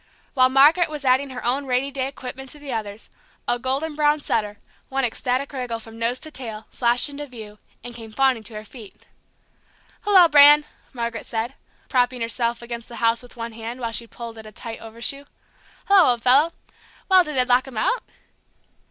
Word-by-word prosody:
While 255 -2 +5
Margaret 295 +6 +5
was 300 -2 -6
adding 260 +2 +3
her 250 -2 -7
own 270 +3 0
rainy 260 +2 0
day 265 -1 -2
equipment 265 -1 -8
to 295 - -5
the 285 -3 -7
others, 215 -1 -6 0.4
a 240 - +1
golden 270 +5 -1
brown 300 0 +2
setter, 210 -7 -2 0.3
one 270 -1 0
ecstatic 255 +4 -2
wriggle 250 -3 -3
from 225 0 -13
nose 235 +2 0
to 310 - -4
tail, 225 -6 -6
flashed 240 +2 +2
into 290 +1 -7
view, 215 -5 -11 0.2
and 245 - -3
came 225 -2 -10
fawning 260 0 +2
to 220 - -5
her 215 - -6
feet. 215 -2 -14 1.0
"Hello, 380 -4 +6
Bran!" 295 -1 +7 0.3
Margaret 235 -2 -4
said, 230 +3 -3 0.3
propping 250 -1 +1
herself 235 0 -1
against 235 -1 -7
the 235 - -9
house 230 0 +1
with 245 0 -15
one 230 0 -5
hand, 230 +2 -7
while 230 -2 -3
she 230 +1 +2
pulled 230 -1 -9
at 220 - -11
a - - -11
tight 225 +2 -8
overshoe. 235 +5 -4 0.6
"Hello, 390 -6 +6
old 235 -1 -8
fellow! 280 +6 +5 0.6
Well, 375 -1 +6
did 305 -3 -6
they 255 -1 +3
lock 250 +1 +3
him 255 -4 -9
out?" - - +1
250 Hz, 190 wpm, -23 LUFS, 230-280 Hz, 1.0 s, Bran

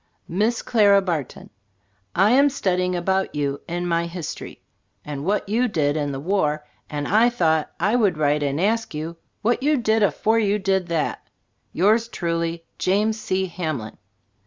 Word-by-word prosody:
6 - - -44 0.2
preface 170 - -7
Miss 225 +2 +2
Clara 205 -4 +5
Barton: 165 -8 -4 0.7
I 195 +4 +4
am 280 +3 +5
studying 180 -8 0
about 190 +1 0
you 140 -1 -2
in 175 +1 -3
my 170 -1 0
History, 170 -2 -7 0.5
and 145 -2 -5
what 205 +2 0
you 235 +5 +1
did 150 -8 0
in 145 -2 -1
the 135 - -4
war, 150 -3 0 0.2
and 145 -1 -3
I 225 +5 +4
thought 160 -9 +1
I 205 +7 +2
would 205 -9 +2
write 150 0 +2
and 140 +1 -1
ask 220 0 0
you 160 +2 -5 0.3
what 240 +3 +1
you 295 +2 +2
did 220 -2 +1
afore 220 +2 +2
you 205 -1 +2
did 190 -2 0
that 165 -3 -2 0.4
Yours 215 +6 +3
truly, 170 -4 -3
James 210 +4 +1
C. 190 -2 -1
Hamlin. 155 -11 -5
180 Hz, 170 wpm, -23 LUFS, 160-215 Hz, 0.7 s, Clara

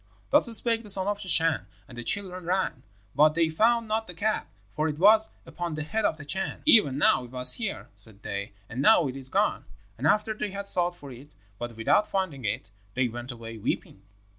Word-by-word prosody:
"Thus - - +5
spoke 230 -1 +1
the 215 - -10
son 190 -1 +7
of 205 0 -2
the 195 - -8
Chan; 165 - +2 0.2
and 120 - -13
the 120 - -7
children 185 +4 0
ran, 180 -7 -1 0.3
but 150 +1 +4
they 165 -1 +2
found 230 +7 +1
not 220 +1 -2
the 180 - -8
cap, 215 +5 -2 0.2
for 155 +1 -1
it 150 -1 -4
was 215 +5 +5 0.2
upon 175 -2 -5
the 155 - -4
head 215 +7 -2
of 155 - 0
the 145 - -11
Chan. 190 +6 -3
'Even 210 - +5
now 140 -3 +3
it - - -13
was 125 0 +4
here,' 220 -5 -4
said 105 0 0
they, 100 0 -5
'and 120 +5 -5
now 170 -1 +5
it 130 - -6
is 135 -1 -1
gone.' - - 0 0.3
And 140 - 0
after 215 +5 +1
they 210 -1 -4
had 200 +1 -6
sought 175 -2 +2
for 140 -2 -11
it, 130 -1 -14 0.2
but 120 -1 -7
without 205 - +2
finding 165 - -3
it, 100 - -4 0.2
they 130 -1 +1
went 120 +2 -7
away 115 -1 -9
weeping. 95 - -4
160 Hz, 220 wpm, -26 LUFS, 125-205 Hz, 0.3 s, son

